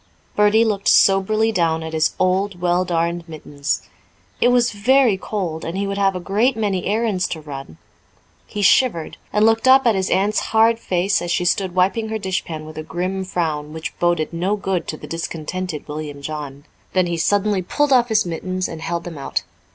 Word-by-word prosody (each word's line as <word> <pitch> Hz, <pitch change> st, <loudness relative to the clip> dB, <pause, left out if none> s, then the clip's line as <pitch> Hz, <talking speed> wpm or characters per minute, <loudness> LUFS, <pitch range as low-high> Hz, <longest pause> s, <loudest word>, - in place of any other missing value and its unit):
Bertie 210 Hz, +2 st, +4 dB
looked 200 Hz, -3 st, -1 dB
soberly 215 Hz, +3 st, +4 dB
down 165 Hz, -5 st, 0 dB
at 160 Hz, 0 st, -6 dB
his 155 Hz, 0 st, +1 dB
old, 185 Hz, 0 st, 0 dB
well 175 Hz, +1 st, +2 dB
darned 170 Hz, -1 st, -1 dB
mittens. 145 Hz, -2 st, -3 dB, 0.6 s
It -, -, +5 dB
was 245 Hz, -1 st, +3 dB
very 245 Hz, +2 st, +3 dB
cold, 185 Hz, -5 st, -4 dB
and 170 Hz, +3 st, -4 dB
he 200 Hz, -, -1 dB
would 200 Hz, 0 st, -3 dB
have 195 Hz, -1 st, +2 dB
a -, -, -2 dB
great 215 Hz, +7 st, +1 dB
many 200 Hz, -4 st, -1 dB
errands 210 Hz, -3 st, 0 dB
to 160 Hz, -, -5 dB
run. 135 Hz, -, -9 dB, 0.7 s
He 205 Hz, -, -4 dB
shivered, 190 Hz, -6 st, +3 dB
and 210 Hz, +1 st, +3 dB
looked 225 Hz, +2 st, +3 dB
up 265 Hz, 0 st, +6 dB
at 230 Hz, -, +5 dB
his 190 Hz, -1 st, -1 dB
aunt's 200 Hz, +3 st, +2 dB
hard 225 Hz, +1 st, +3 dB
face 190 Hz, 0 st, 0 dB
as 175 Hz, -, -4 dB
she 175 Hz, +1 st, 0 dB
stood 185 Hz, 0 st, 0 dB
wiping 195 Hz, +5 st, +1 dB
her 220 Hz, -, -2 dB
dish 190 Hz, -3 st, -2 dB
pan 155 Hz, -2 st, -7 dB
with 155 Hz, 0 st, -8 dB
a -, -, -3 dB
grim 185 Hz, +4 st, -3 dB
frown 155 Hz, -5 st, -3 dB
which 160 Hz, 0 st, -5 dB
boded 175 Hz, -2 st, +1 dB
no 180 Hz, +5 st, 0 dB
good 190 Hz, -4 st, -2 dB
to 155 Hz, -, -4 dB
the -, -, -10 dB
discontented 165 Hz, 0 st, -5 dB
William 150 Hz, -1 st, -6 dB
John. 145 Hz, -2 st, -6 dB, 0.3 s
Then 185 Hz, -1 st, +3 dB
he 170 Hz, -1 st, -2 dB
suddenly 205 Hz, +3 st, +1 dB
pulled 285 Hz, +10 st, +1 dB
off 245 Hz, -1 st, +4 dB
his 215 Hz, -2 st, +2 dB
mittens 185 Hz, +2 st, -3 dB
and 160 Hz, -1 st, -8 dB
held 170 Hz, +1 st, -3 dB
them 165 Hz, -4 st, -8 dB
out. 135 Hz, -, -2 dB
185 Hz, 200 wpm, -20 LUFS, 165-210 Hz, 0.7 s, up